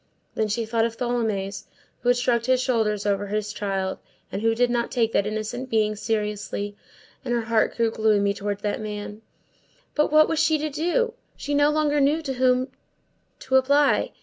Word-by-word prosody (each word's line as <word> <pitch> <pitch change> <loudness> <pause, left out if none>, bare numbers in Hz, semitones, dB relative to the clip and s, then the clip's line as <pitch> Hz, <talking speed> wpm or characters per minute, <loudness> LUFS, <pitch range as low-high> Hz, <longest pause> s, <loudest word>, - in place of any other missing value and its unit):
Then 220 - 0
she 225 +2 -1
thought 225 0 0
of 230 0 -10
Tholomyès, 220 -5 -2 0.3
who 245 - 0
had 245 - +4
shrugged 240 -1 +1
his 255 0 +3
shoulders 220 -5 0
over 200 0 0
his 210 0 -2
child, 195 -2 -2 0.3
and 200 - -3
who 225 0 +2
did 245 +1 +2
not 235 -1 0
take 230 -3 +1
that 200 - +1
innocent 220 +4 -4
being 215 -2 +1
seriously; 210 -1 -3 0.5
and 250 - -4
her 235 - +1
heart 225 -1 +1
grew 230 -1 +2
gloomy 210 -2 +2
toward 205 0 -4
that 205 +1 -2
man. 210 0 -6 0.7
But 300 0 +1
what 310 0 +6
was 320 - -1
she 315 0 +3
to 305 0 -3
do? 355 - 0 0.2
She 290 - -4
no 290 +1 +4
longer 300 -1 +1
knew 300 +4 +2
to 270 - -3
whom 255 0 +2 0.7
to 265 0 +2
apply. 280 +2 +3
230 Hz, 185 wpm, -24 LUFS, 210-265 Hz, 0.7 s, what